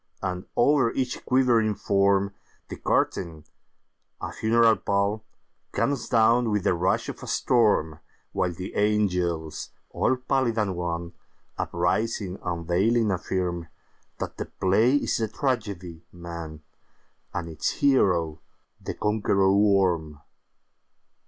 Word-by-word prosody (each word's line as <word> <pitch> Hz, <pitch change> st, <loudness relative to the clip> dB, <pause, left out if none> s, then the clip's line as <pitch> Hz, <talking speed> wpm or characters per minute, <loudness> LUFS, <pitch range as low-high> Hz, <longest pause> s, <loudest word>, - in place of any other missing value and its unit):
And, 90 Hz, -1 st, -3 dB
over 135 Hz, -5 st, +3 dB
each 130 Hz, -1 st, -2 dB
quivering 120 Hz, -5 st, +3 dB
form, 100 Hz, 0 st, +2 dB, 0.4 s
The -, -, -6 dB
curtain, 80 Hz, -4 st, -1 dB, 0.7 s
a -, -, -5 dB
funeral 115 Hz, 0 st, +3 dB
pall, 100 Hz, +2 st, 0 dB, 0.5 s
Comes 140 Hz, -4 st, -1 dB
down 115 Hz, +1 st, +4 dB
with 105 Hz, -3 st, 0 dB
the -, -, +3 dB
rush 90 Hz, +2 st, 0 dB
of -, -, -7 dB
a -, -, -8 dB
storm, 105 Hz, -10 st, +2 dB, 0.3 s
While 90 Hz, -1 st, 0 dB
the 90 Hz, +2 st, -7 dB
angels, 90 Hz, -7 st, 0 dB, 0.2 s
all 130 Hz, -, +1 dB
pallid 125 Hz, -2 st, 0 dB
and 100 Hz, -4 st, 0 dB
wan, 85 Hz, -1 st, -4 dB, 0.5 s
Uprising, 95 Hz, +2 st, -1 dB
unveiling, 90 Hz, +7 st, +1 dB
affirmThat 90 Hz, -2 st, -5 dB
the -, -, -3 dB
play 110 Hz, +8 st, +3 dB
is 145 Hz, -, +1 dB
the 110 Hz, -, 0 dB
tragedy, 100 Hz, -, -3 dB
'Man,'And 85 Hz, 0 st, -10 dB
its 80 Hz, -2 st, -2 dB
hero 85 Hz, -, +2 dB, 0.4 s
the -, -, -4 dB
Conqueror 100 Hz, -2 st, +2 dB
Worm. 95 Hz, -7 st, +2 dB
100 Hz, 110 wpm, -26 LUFS, 85-115 Hz, 0.7 s, down